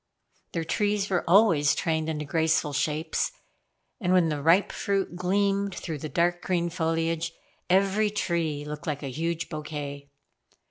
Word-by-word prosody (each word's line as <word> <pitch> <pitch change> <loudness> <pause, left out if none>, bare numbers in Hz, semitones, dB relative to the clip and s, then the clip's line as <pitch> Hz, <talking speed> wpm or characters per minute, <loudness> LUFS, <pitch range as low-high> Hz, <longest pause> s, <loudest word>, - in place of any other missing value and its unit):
Their 165 - -1
trees 205 +3 0
were 180 - +1
always 170 -8 +5
trained 160 -1 -1
into 150 -1 -3
graceful 160 0 +1
shapes, 155 - 0 0.7
and 180 -5 0
when 180 -3 +4
the 150 -2 -2
ripe 170 +6 +4
fruit 195 -3 -1
gleamed 195 +1 +1
through 160 -4 -5
the 155 - -5
dark 175 +4 +1
green 175 -2 0
foliage, 165 0 -1 0.4
every 195 +3 +3
tree 165 -7 -1
looked 150 +3 -7
like 145 -1 -2
a 135 - -4
huge 165 +3 -2
bouquet. 145 -2 -6
165 Hz, 145 wpm, -27 LUFS, 150-185 Hz, 0.7 s, always